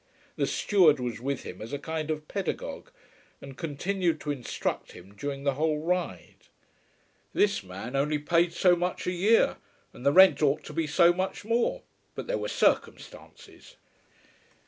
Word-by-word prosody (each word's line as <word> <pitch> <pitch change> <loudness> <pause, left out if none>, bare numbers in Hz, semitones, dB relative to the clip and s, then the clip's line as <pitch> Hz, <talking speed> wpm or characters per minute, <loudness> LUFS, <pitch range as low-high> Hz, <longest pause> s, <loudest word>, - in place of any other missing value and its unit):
The - - 0
steward 170 -8 +3
was 120 -3 -4
with 140 +1 -3
him 90 - -9
as 110 - -7
a - - -1
kind 160 +1 -4
of 155 -1 -3
pedagogue, 195 -3 -4 0.5
and 135 -1 -11
continued 170 +3 -1
to 150 - -2
instruct 135 -4 -4
him 95 +3 -14
during 140 +6 -5
the 140 -1 +1
whole 155 +2 0
ride. 175 +4 -3 0.9
This 205 -1 +2
man 100 +7 -8
only 150 +2 +1
paid 170 +3 +2
so 180 +1 +4
much 180 +1 -3
a 180 - 0
year, 185 - +3 0.4
and - - -12
the 140 - +4
rent 190 +2 +7
ought 145 0 +2
to - - -9
be 165 -2 -1
so 170 +3 +5
much 190 +3 -3
more; 240 - 0 0.3
but - - -5
there - - -2
were - - -3
circumstances. - - -2
155 Hz, 165 wpm, -28 LUFS, 140-180 Hz, 0.9 s, rent